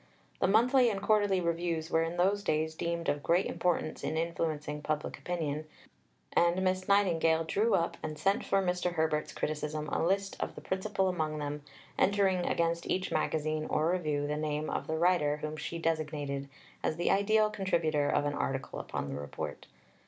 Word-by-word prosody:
The - - +3
monthly 245 +5 +5
and 200 -3 -2
quarterly 205 -2 +3
Reviews 170 -1 -1
were 160 - +3
in 165 +1 -2
those 195 +3 +2
days 155 -1 0
deemed 170 +1 -3
of 145 - 0
great 175 +5 +2
importance 175 -3 -1
in 160 - -1
influencing 155 -3 -2
public 150 0 -3
opinion, 155 -3 -3 0.7
and 175 +2 +3
Miss 185 0 0
Nightingale 165 -5 +3
drew 210 +8 +2
up 170 - 0
and 155 -1 -5
sent 195 +4 +1
for 195 - +2
Mr. 180 -1 0
Herbert's 160 -2 0
criticism 150 0 -3
a - - 0
list 195 +3 0
of - - -3
the - - -8
principal 190 0 -1
among 155 -4 -1
them, 145 0 -4 0.4
entering 190 -2 +3
against 170 0 0
each 185 0 0
magazine 155 0 0
or 155 +2 +2
review 155 -5 0
the 150 +1 -1
name 150 0 -2
of - - -3
the 160 - -1
writer 160 -4 +3
whom 155 0 -4
she 165 +2 -5
designated 150 -4 -2 0.3
as 155 - 0
the 175 - +1
ideal 215 +2 +3
contributor 165 -7 +1
of 145 - +2
an 145 - 0
article 135 -1 -3
upon - - -4
the 70 +1 -4
Report. 70 - -6
165 Hz, 175 wpm, -31 LUFS, 155-185 Hz, 0.7 s, monthly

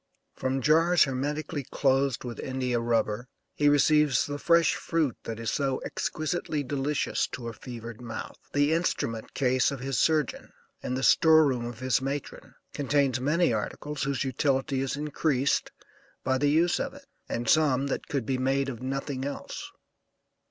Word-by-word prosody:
From 130 0 -2
jars 165 +3 +5
hermetically 145 +3 -2
closed 135 -2 +1
with 120 -3 -6
India 130 -2 -1
rubber 115 0 0 0.3
he 145 0 +3
receives 145 -3 +4
the 145 0 -5
fresh 170 0 +4
fruit 155 -7 -1
that 115 0 -5
is 115 -1 -2
so 135 -2 0
exquisitely 155 -1 -2
delicious 140 +2 -1
to 120 -2 -5
a - - -7
fevered 115 -1 -9
mouth. 115 -2 -7
The 145 +2 +2
instrument 115 -9 -2
case 130 -2 +2
of 140 -2 -5
his 135 +1 -2
surgeon, 155 -4 0 0.3
and 125 - -2
the 130 - -3
store 160 +1 +6
room 125 -4 0
of 120 0 -8
his 130 0 +1
matron 140 +1 -5 0.2
contains 140 -2 +1
many 150 +1 +2
articles 145 +6 -4
whose 140 0 0
utility 135 +1 0
is 135 0 -2
increased 145 -2 0 0.5
by 130 0 +1
the 145 +1 +3
use 165 +4 +3
of - - -3
it, 280 0 -14 0.2
and 115 0 -3
some 140 -2 +3
that 140 - -3
could 135 -5 -2
be 130 +1 -1
made 135 +1 +1
of 120 -3 -7
nothing 135 0 -3
else. 140 +1 -6
135 Hz, 160 wpm, -28 LUFS, 125-150 Hz, 0.5 s, store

